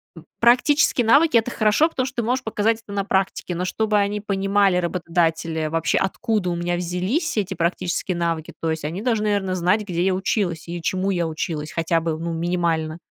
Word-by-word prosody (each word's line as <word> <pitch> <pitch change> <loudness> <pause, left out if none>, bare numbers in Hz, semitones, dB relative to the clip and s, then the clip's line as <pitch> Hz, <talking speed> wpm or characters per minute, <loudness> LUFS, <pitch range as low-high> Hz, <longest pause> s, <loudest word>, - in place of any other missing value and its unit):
м, 165 - -13
практические 245 +1 +4
навыки- 285 +2 +5
это 230 +2 0
хорошо. 215 +9 +3
Потому 260 -6 -2
что 265 - -9
ты 235 - -1
можешь 255 +2 0
показать 220 +1 0
это 210 - -13
на 200 -1 -1
практике, 190 -2 -1
но 175 - -2
чтобы 215 +2 0
они 205 +1 -1
понимали, 195 -2 +2
работодатели, 165 -2 -1
вообще, 165 +1 0
откуда 205 -1 -1
у 175 - -1
меня 175 +1 -1
взялись 185 - -1
эти 195 -1 -1
практические 175 +1 -1
навыки, 165 -2 -2
то 165 -1 -1
есть 160 -2 -4
они 170 +6 -4
должны, 225 -4 +1
наверное, 200 -3 0
знать, 185 +5 +2
где 175 -3 -2
я 190 - +2
училась 185 -4 -1
и 170 0 -5
чему 190 +3 0
я 175 -3 0
училась, 155 -1 -4
хотя 165 0 0
бы, 160 -1 -2
ну, 165 +1 -4
минимально. 165 -2 -1
185 Hz, 195 wpm, -22 LUFS, 170-215 Hz, -, навыки